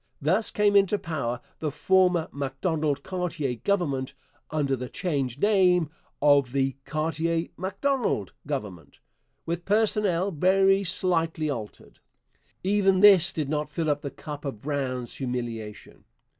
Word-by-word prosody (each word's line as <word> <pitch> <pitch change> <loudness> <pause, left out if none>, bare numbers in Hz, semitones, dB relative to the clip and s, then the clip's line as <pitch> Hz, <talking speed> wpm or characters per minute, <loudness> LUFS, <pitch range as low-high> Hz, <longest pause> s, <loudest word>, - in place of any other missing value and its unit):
Thus 185 +9 +1
came 205 -1 +2
into 200 +1 +4
power 150 -10 -3 0.2
the 155 - -1
former 180 +2 +2
Macdonald 145 +1 -2
Cartier 170 -8 -2
Government, 140 -9 0 0.3
under 145 -3 0
the 125 -1 -6
changed 140 -6 -2
name 180 -6 +3 0.3
of 140 -3 +4
the 135 -1 +1
Cartier 165 +2 -1
Macdonald 195 - -1
Government, 105 - -5 0.5
with 170 +1 -3
personnel 200 -3 +2
very 195 +4 +3
slightly 165 -4 0
altered. 110 -6 -8 0.6
Even 195 -1 +3
this 195 -4 +7
did 155 -3 -3
not 150 +1 -2
fill 155 +1 -1
up 145 0 -1
the 140 - -4
cup 145 +2 -8
of 135 -7 -5
Brown's 130 -3 -3
humiliation. 120 -5 -5
155 Hz, 125 wpm, -26 LUFS, 140-185 Hz, 0.6 s, this